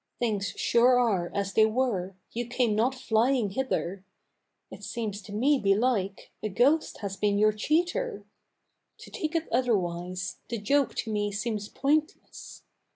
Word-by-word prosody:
Things 210 -4 -1
sure 245 +2 +4
are 195 -8 +1
as 200 -1 -1
they 220 0 +5
were! 215 -6 -1 0.2
You 240 0 -3
came 240 -3 +1
not 245 +5 +1
flying 240 -2 +1
hither! 195 -6 -2 0.7
It - - -11
seems 215 -4 -4
to 200 - -12
me, 265 +7 +2
belike, 200 -1 0
a 215 - -2
ghost 270 +10 +2
has 200 -2 -4
been 205 0 +1
your 215 +1 +4
cheater. 345 - 0 0.7
To - - -13
take 315 +1 -3
it 325 -1 0
otherwise, 180 -7 -1
the 235 - -2
joke 275 +7 +1
to 225 - -3
me 205 -1 -1
seems 210 0 -3
pointless. 300 +6 -2
220 Hz, 150 wpm, -28 LUFS, 200-260 Hz, 0.7 s, they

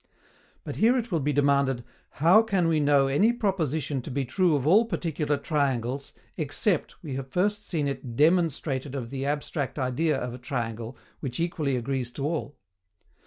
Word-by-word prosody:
But - - -6
here 240 +4 +4
it 235 -2 -3
will 165 - +1
be 145 +1 0
demanded, 140 -3 +2 0.3
HOW 170 +8 +6
WE 225 - -7
CAN 165 -7 +2
KNOW 140 -1 +5
ANY 200 +13 +3
PROPOSITION 160 - -1
TO 125 - -8
BE 135 0 -1
TRUE 170 +5 +2
OF 140 -2 -1
ALL 205 +9 +5
PARTICULAR 155 -8 -1
TRIANGLES, 140 -3 -1 0.2
EXCEPT 160 +3 0
we 145 -5 -5
have 135 0 -4
first 205 +8 -1
seen 155 -5 0
it 130 -3 -5
DEMONSTRATED 150 -3 +1
OF 120 -4 -5
THE 135 0 -3
ABSTRACT 145 -1 -2
IDEA 140 +3 +1
OF 125 -2 -4
A - - -7
TRIANGLE 115 -2 -4 0.2
which 130 -2 -5
equally 160 -5 0
agrees 125 0 -2
to 140 +2 -3
all? 145 -4 -3
145 Hz, 170 wpm, -27 LUFS, 130-165 Hz, 0.3 s, HOW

